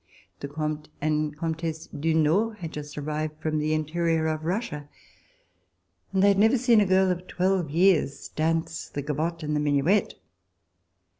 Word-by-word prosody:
The 140 - -5
Comte 150 +1 -4
and 150 0 -1
Comtesse 160 0 -3
du 160 +2 -1
Nord 195 +9 +2
had 165 -5 -6
just 150 -1 -8
ar 145 - -4
rived 155 +1 -3
from 155 -1 -1
the 155 +1 +1
interior 160 +1 0
of 155 0 -2
Russia, 165 -6 -3 1.2
and 190 0 +2
they - - +6
had 200 -1 +3
never 225 +5 +5
seen 235 -3 +4
a 200 - +2
girl 190 0 +4
of 180 0 -4
twelve 185 -3 0
years 165 -3 +2
dance 165 +1 -1
the 145 - -5
gavotte 160 +3 -2
and 150 0 -1
the - - +1
minuet. 150 +7 +2
160 Hz, 165 wpm, -26 LUFS, 150-180 Hz, 1.2 s, they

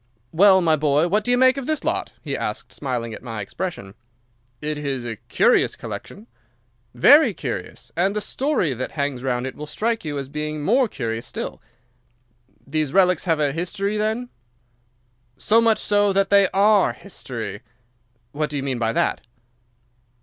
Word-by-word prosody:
"Well, 190 +2 +6
my 160 -2 +3
boy, 150 +2 +2
what 210 +3 +1
do 245 - -3
you 245 - +4
make 260 +1 +5
of 275 - -5
this 310 -1 -1
lot?" - - -1
he - - -3
asked, - - -4
smiling 120 -5 -3
at - - -8
my 115 -3 -6
expression. 100 - -5 0.7
"It 150 0 -3
is 135 -4 -3
a 115 -2 -5
curious - - +2
collection." 205 +3 -8 0.7
"Very 290 - +6
curious, - - -6
and 190 +4 +1
the - - +1
story 230 - 0
that 130 +1 -5
hangs 140 -4 -2
round 125 -1 -1
it 130 - -4
will 150 - -8
strike 225 +7 -1
you 150 -3 -4
as 135 -1 -4
being 150 +1 -4
more 245 - +3
curious 115 - -4
still." - - -6 1.0
"These 155 -2 -2
relics 180 -3 +3
have 165 -3 +1
a 145 -2 +2
history 195 +5 -2
then?" 220 +3 -1 1.1
"So 225 - +3
much 225 -1 +3
so 205 -1 +2
that 195 0 +1
they 200 -1 +6
are 205 +1 +3
history." 115 - -7 0.7
"What 150 +2 -2
do 145 - -3
you 135 - -3
mean 130 -3 -2
by 115 -1 0
that?" - - 0
160 Hz, 170 wpm, -22 LUFS, 135-205 Hz, 1.1 s, Well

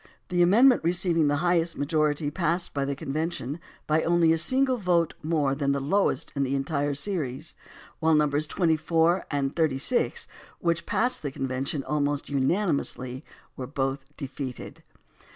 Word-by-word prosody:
The 175 -1 +1
amendment 235 +8 +5
receiving 170 -2 +2
the 145 - +2
highest 170 -1 +1
majority 150 0 0
passed 170 +1 -1
the 140 0 -1
convention 150 0 -3 0.3
by 155 +1 +2
only 170 -1 +3
a - - +1
single 260 +7 +3
vote 175 -5 +1
more 155 -4 0
than 140 0 0
the 140 - -1
lowest 155 0 0
in 140 - -1
the 135 0 0
entire 140 +1 -1
series, 145 -3 -2 0.5
while 160 -1 +3
Nos. 150 0 +1
24 165 +1 +1
and 140 -1 -1
36, 160 - +1 0.3
which 170 -1 -1
passed 250 +2 +1
the 145 - -3
convention 135 +1 -3
almost 145 -1 -1
unanimously, 140 -3 0 0.3
were 130 - -6
both 135 0 -2
defeated. 130 -2 -7
155 Hz, 140 wpm, -26 LUFS, 140-170 Hz, 0.5 s, amendment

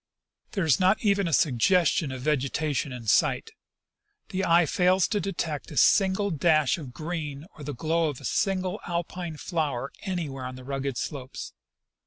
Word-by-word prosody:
" - - -46
There 195 -5 0
is 155 - +4
not 190 +3 +4
even 200 -2 +3
a - - -2
suggestion 155 +3 +3
of 130 -1 -6
vegetation 145 0 0
in 125 -2 -7
sight. 105 - +2 0.8
The 190 0 -2
eye 170 -1 +5
fails 185 +3 +3
to 210 - +1
detect 170 -6 -3
a 150 - -8
single 195 0 +4
dash 155 -1 +3
of 135 -6 -8
green 155 -1 -5
or 150 - -10
the 145 -1 -5
glow 160 +4 +1
of 145 - -6
a - - -10
single 190 +1 0
Alpine 170 -1 -4
flower 145 -6 -2
anywhere 155 -9 -4
on 130 0 -6
the 130 - -10
rugged 135 -1 -3
slopes. 130 -2 -5
160 Hz, 170 wpm, -27 LUFS, 140-180 Hz, 0.8 s, eye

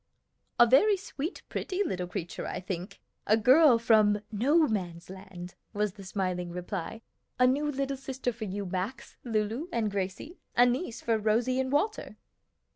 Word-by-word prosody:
"A 240 - +9
very 390 - +5
sweet, 340 -3 -6
pretty 385 +1 -2
little 180 - -3
creature, 180 -2 -5
I - - -4
think; 185 0 -6 0.3
a - - +4
little 220 - -3
girl 260 0 +7
from 215 -3 +4
'No 290 +9 +3
Man's 180 -5 -4
Land,'" 190 -2 -9 0.2
was 210 -2 -1
the 195 - -11
smiling 185 -2 -2
reply. 180 +5 -5 0.3
"A 250 - +5
new 285 +4 +2
little 275 0 -2
sister 260 -2 -3
for 220 -1 -6
you, 200 +1 -4
Max, 190 +7 -5
Lulu, 225 +6 -1
and 220 -8 0
Gracie, 195 - -4 0.2
a 245 - +7
niece 245 +1 -1
for 225 -1 +1
Rosie 230 +4 +1
and 260 0 -1
Walter." 410 +10 -1
225 Hz, 165 wpm, -29 LUFS, 190-265 Hz, 0.3 s, A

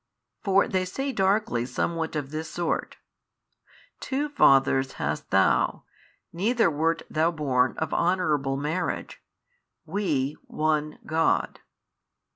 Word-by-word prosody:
For 195 -1 +3
they 185 -1 0
say 270 +10 -3
darkly 195 - +1
somewhat 160 +5 -2
of 145 -2 -3
this 155 +1 -4
sort, 175 -1 -2 1.0
Two 285 +3 -2
fathers 135 - +4
hast - - -3
Thou, - - +2 0.5
neither 215 +2 +2
wert 160 +2 0
Thou 160 +2 +1
born 135 -6 +1
of 160 -1 -2
honourable 155 -7 +1
marriage, 150 +6 -3 0.6
WE 150 -8 -1
One, 155 -1 -1
God. 160 +1 +1
160 Hz, 105 wpm, -26 LUFS, 145-185 Hz, 1.0 s, fathers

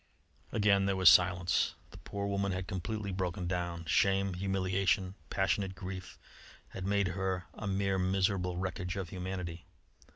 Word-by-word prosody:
Again 100 -2 +3
there 100 - +1
was 95 -2 +8
silence. 90 0 +4 0.2
The - - -12
poor 100 0 -4
woman 100 0 0
had 95 0 -3
completely 105 +1 -3
broken 90 0 -2
down. 85 -1 -2
Shame, 95 +5 +2
humiliation, 95 0 0 0.2
passionate 95 0 0
grief, 95 0 -7 0.5
had 95 0 -5
made 100 -1 +2
of - - -4
her 95 -1 -2
a 105 - -6
mere 95 0 +1
miserable 95 -1 +1
wreckage 95 +1 -3
of 95 -4 -4
humanity. 90 -2 -5
95 Hz, 150 wpm, -32 LUFS, 90-100 Hz, 0.5 s, was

